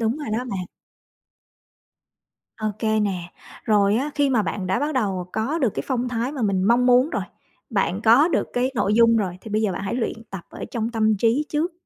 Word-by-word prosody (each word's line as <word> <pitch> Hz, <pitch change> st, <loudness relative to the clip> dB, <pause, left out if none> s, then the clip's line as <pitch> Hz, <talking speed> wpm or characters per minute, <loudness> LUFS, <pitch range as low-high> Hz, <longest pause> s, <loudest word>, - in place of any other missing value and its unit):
Đúng 225 Hz, +3 st, 0 dB
rồi 295 Hz, -, -6 dB
đó 220 Hz, -, +1 dB
bạn. 185 Hz, -3 st, -3 dB, 1.9 s
OK 215 Hz, 0 st, -4 dB, 0.2 s
nè. 180 Hz, -4 st, -3 dB, 0.3 s
Rồi 205 Hz, -1 st, +3 dB
á 275 Hz, +6 st, -1 dB
khi 285 Hz, -1 st, +2 dB
mà 245 Hz, -5 st, +3 dB
bạn 185 Hz, +1 st, -3 dB
đã 190 Hz, -, +1 dB
bắt 295 Hz, +2 st, -1 dB
đầu 195 Hz, -8 st, -1 dB
có 225 Hz, +9 st, -1 dB
được 260 Hz, -6 st, +2 dB
cái -, -, -3 dB
phong 250 Hz, -2 st, -1 dB
thái 245 Hz, +2 st, -2 dB
mà 285 Hz, -4 st, -5 dB
mình 195 Hz, -4 st, +1 dB
mong 235 Hz, +5 st, +3 dB
muốn 250 Hz, +3 st, +5 dB
rồi, -, -, -2 dB, 0.5 s
bạn 195 Hz, -3 st, 0 dB
có 240 Hz, +8 st, +6 dB
được 350 Hz, -, 0 dB
cái 250 Hz, +2 st, 0 dB
nội 210 Hz, -3 st, +1 dB
dung 230 Hz, 0 st, +5 dB
rồi 185 Hz, -4 st, -2 dB
thì 225 Hz, -, -9 dB
bây 215 Hz, +1 st, 0 dB
giờ 210 Hz, -3 st, +1 dB
bạn 180 Hz, -, -4 dB
hãy 200 Hz, -, -3 dB
luyện 230 Hz, -2 st, -3 dB
tập 195 Hz, -3 st, -7 dB
ở -, -, -7 dB
trong 230 Hz, -1 st, -2 dB
tâm 220 Hz, -2 st, +2 dB
trí 235 Hz, +8 st, +2 dB
trước. 310 Hz, +4 st, -1 dB
225 Hz, 220 wpm, -23 LUFS, 200-250 Hz, 1.9 s, có